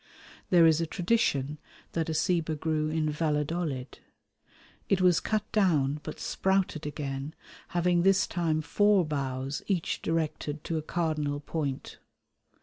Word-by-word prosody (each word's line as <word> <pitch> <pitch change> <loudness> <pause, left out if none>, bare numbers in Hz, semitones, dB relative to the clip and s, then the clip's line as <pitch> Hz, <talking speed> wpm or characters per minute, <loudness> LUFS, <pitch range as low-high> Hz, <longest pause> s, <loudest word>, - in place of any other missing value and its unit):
There 175 -2 +6
is 160 0 +4
a 165 - -1
tradition 155 - 0 0.3
that 165 -1 -1
a 160 - -1
ceiba 165 -3 +1
grew 155 0 -1
in 155 -1 0
Valladolid. 150 -3 -2 0.9
It 195 - +3
was 180 -2 +4
cut 215 -1 -1
down 150 -9 +2
but 155 - -7
sprouted 190 -5 0
again, 140 0 -4 0.3
having 175 0 +2
this 195 +2 +4
time 160 -3 -1
four 205 +2 +3
boughs 135 -1 -3
each 185 -5 -1
directed 155 -2 -2
to 165 -1 -2
a - - -4
cardinal 155 -3 -1
point. 145 -2 -4
160 Hz, 135 wpm, -29 LUFS, 150-175 Hz, 0.9 s, There